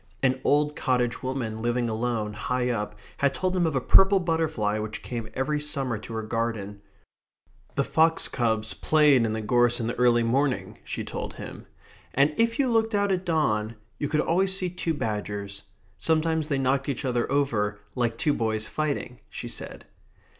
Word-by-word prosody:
An 130 0 +2
old 150 +1 +2
cottage 125 -3 0
woman 125 -4 -3
living 120 +1 0
alone, 110 -1 -1
high 125 +3 -1
up, 105 -3 -3 0.2
had 140 0 +1
told 185 0 -1
him 175 -2 +2
of 155 - -2
a - - +3
purple 195 +9 +6
butterfly 160 - 0
which 110 0 -5
came 115 -3 -5
every 150 +3 0
summer 135 -6 -2
to 115 - -9
her 110 0 -3
garden. 110 -3 -3 0.9
The - - +2
fox 160 0 +3
cubs 110 -4 0
played 145 -5 +4
in 110 - -2
the 110 0 -3
gorse 120 +1 +3
in 115 - -2
the 120 - -1
early 120 -1 +4
morning, 130 +3 0
she - - -4
told - - -5
him. - - -9 0.5
And 140 +3 +4
if 230 +1 +2
you 275 - +2
looked 225 -2 +2
out 200 -1 +2
at 185 -1 -1
dawn 115 -10 +1 0.2
you 145 - -1
could 150 - +2
always 190 +3 +1
see 185 -2 -2
two 170 -2 -2
badgers. 105 -4 -4 0.4
Sometimes 160 -1 +1
they 140 -3 0
knocked 135 +1 +1
each 140 +1 -3
other 120 -1 0
over 110 -8 +1
like 120 -2 -1
two 150 - +2
boys 110 -3 0
fighting, 145 -4 -3
she - - -6
said. - - -6
130 Hz, 180 wpm, -26 LUFS, 115-155 Hz, 0.9 s, purple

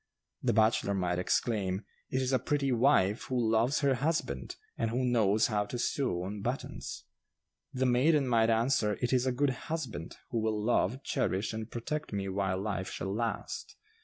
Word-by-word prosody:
The - - +2
bachelor 110 -2 +3
might 90 -2 0
exclaim, 95 0 0 0.2
'It 130 0 0
is 130 +1 0
a 130 - +4
pretty 140 -2 0
wife 115 -5 +3
who 130 - -2
loves 115 +6 +2
her 140 -2 +3
husband, 130 - -1 0.2
and 115 - -1
who 125 +3 0
knows 110 -3 +3
how 105 -2 0
to 120 - -4
sew 120 -7 0
on 100 +2 -5
buttons.' 120 +5 -4 0.7
The 130 0 0
maiden 135 +3 +3
might 115 -2 +3
answer, 115 -2 +2
'It 125 +1 0
is 130 0 +2
a - - +3
good 135 +2 +1 0.2
husband, 135 - -4
who 115 - 0
will 110 -1 0
love, 120 +3 +1
cherish 105 -5 -1
and 110 0 -5
protect 135 +4 -4
me 100 -1 -2
while 95 -1 -1
life 95 -2 -2
shall 95 +3 -4
last. 115 +2 -3
115 Hz, 175 wpm, -31 LUFS, 100-130 Hz, 0.7 s, a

